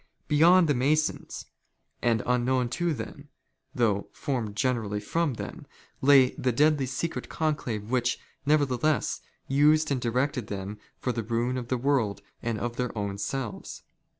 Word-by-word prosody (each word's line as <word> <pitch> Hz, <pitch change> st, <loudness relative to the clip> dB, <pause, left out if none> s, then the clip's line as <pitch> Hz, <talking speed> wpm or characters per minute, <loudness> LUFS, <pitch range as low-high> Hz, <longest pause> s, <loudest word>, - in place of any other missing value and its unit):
Beyond 170 Hz, +4 st, +6 dB
the 145 Hz, -, +3 dB
Masons, 150 Hz, +5 st, 0 dB, 0.6 s
and 115 Hz, -3 st, +2 dB
unknown 125 Hz, 0 st, +1 dB
to 175 Hz, +6 st, 0 dB
them, 140 Hz, +2 st, -6 dB, 0.5 s
thougli 105 Hz, -4 st, +1 dB
formed 120 Hz, -8 st, -3 dB
generally 110 Hz, -4 st, 0 dB
from 150 Hz, +6 st, -1 dB
them, -, -, -7 dB, 0.3 s
lay 135 Hz, -2 st, +6 dB
the 130 Hz, -, -1 dB
deadly 145 Hz, +1 st, +3 dB
secret 135 Hz, +6 st, -3 dB
conclave 125 Hz, -9 st, -2 dB
which, 125 Hz, -1 st, +1 dB, 0.3 s
nevertheless, 145 Hz, 0 st, +1 dB, 0.3 s
used 150 Hz, +3 st, +4 dB
and 130 Hz, -3 st, 0 dB
directed 125 Hz, 0 st, 0 dB
them 100 Hz, +1 st, -5 dB, 0.2 s
for 125 Hz, -, -1 dB
the 120 Hz, -, -2 dB
ruin 120 Hz, +3 st, -1 dB
of 125 Hz, -2 st, -4 dB
the 130 Hz, -, 0 dB
world 125 Hz, -6 st, 0 dB, 0.2 s
and 115 Hz, -2 st, -2 dB
of 120 Hz, +3 st, -4 dB
their 125 Hz, -2 st, -2 dB
own 100 Hz, -1 st, -3 dB
selves. 130 Hz, -1 st, -4 dB
125 Hz, 145 wpm, -27 LUFS, 115-145 Hz, 0.6 s, Beyond